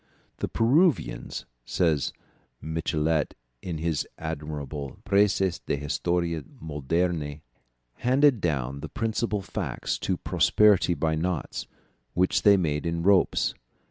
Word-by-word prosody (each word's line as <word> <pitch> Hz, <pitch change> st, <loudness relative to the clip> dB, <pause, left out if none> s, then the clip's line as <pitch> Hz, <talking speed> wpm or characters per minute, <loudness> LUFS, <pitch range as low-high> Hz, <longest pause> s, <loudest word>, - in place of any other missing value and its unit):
"The -, -, -2 dB
Peruvians," 145 Hz, +9 st, +1 dB, 0.2 s
says 80 Hz, 0 st, +1 dB, 0.5 s
Michelet 80 Hz, -1 st, -1 dB, 0.3 s
in 85 Hz, -3 st, -4 dB
his 80 Hz, -1 st, -1 dB
admirable 75 Hz, -3 st, -5 dB
Précis 100 Hz, -3 st, +3 dB
d'Histoire 85 Hz, +3 st, -1 dB, 0.2 s
Moderne, 75 Hz, 0 st, -1 dB, 0.6 s
"handed 130 Hz, -2 st, +3 dB
down 70 Hz, -5 st, -1 dB
the -, -, -6 dB
principal 110 Hz, -2 st, -1 dB
facts -, -, -3 dB
to -, -, -1 dB
posterity 100 Hz, -4 st, +4 dB
by 80 Hz, -1 st, 0 dB
knots, 85 Hz, -1 st, -2 dB, 0.5 s
which 90 Hz, +1 st, +2 dB
they 100 Hz, -1 st, +6 dB
made 80 Hz, -3 st, -1 dB
in 85 Hz, 0 st, -1 dB
ropes. 100 Hz, 0 st, +3 dB
85 Hz, 105 wpm, -27 LUFS, 75-95 Hz, 0.6 s, they